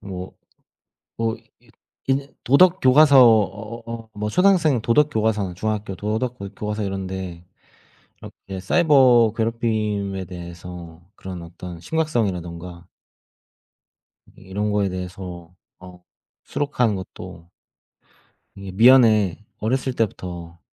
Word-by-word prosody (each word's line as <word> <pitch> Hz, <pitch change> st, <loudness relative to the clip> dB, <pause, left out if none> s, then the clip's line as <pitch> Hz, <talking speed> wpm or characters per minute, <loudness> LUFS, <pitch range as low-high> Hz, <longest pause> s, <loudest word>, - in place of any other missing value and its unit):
뭐 95 Hz, -2 st, -7 dB, 0.9 s
뭐 115 Hz, 0 st, -1 dB
이 115 Hz, +1 st, -29 dB, 0.4 s
인제 135 Hz, +1 st, -1 dB
도덕 180 Hz, +7 st, +5 dB
교과서 140 Hz, +2 st, +6 dB
어 110 Hz, +1 st, +1 dB, 0.2 s
어 -, -, -32 dB
뭐 105 Hz, 0 st, -3 dB
초등학생 175 Hz, -, +3 dB
도덕 140 Hz, +7 st, +3 dB
교과서나 105 Hz, -5 st, 0 dB
중학교 105 Hz, +1 st, -3 dB
도덕 110 Hz, +6 st, -3 dB
교 100 Hz, 0 st, -6 dB
교과서 105 Hz, +1 st, -4 dB
이런 95 Hz, -1 st, -3 dB
데 90 Hz, -2 st, -6 dB, 0.8 s
이렇게 95 Hz, -1 st, -9 dB
사이버 125 Hz, -, +4 dB
괴롭힘에 110 Hz, -4 st, -1 dB
대해서 85 Hz, -1 st, -10 dB
그런 90 Hz, -2 st, -8 dB
어떤 85 Hz, +1 st, -9 dB
심각성이라든가 90 Hz, -, -3 dB, 1.5 s
이 -, -, -19 dB
이런 100 Hz, +3 st, -3 dB
거에 100 Hz, -1 st, +1 dB
대해서 90 Hz, -1 st, -7 dB, 0.2 s
어 90 Hz, -1 st, -14 dB, 0.4 s
수록하는 125 Hz, -6 st, 0 dB
것도 85 Hz, -2 st, -10 dB, 1.1 s
이게 100 Hz, -1 st, -8 dB
미연에 110 Hz, -4 st, +5 dB, 0.2 s
어렸을 130 Hz, +4 st, -1 dB
때부터 90 Hz, -7 st, -4 dB
105 Hz, 245 characters per minute, -22 LUFS, 90-120 Hz, 1.5 s, 교과서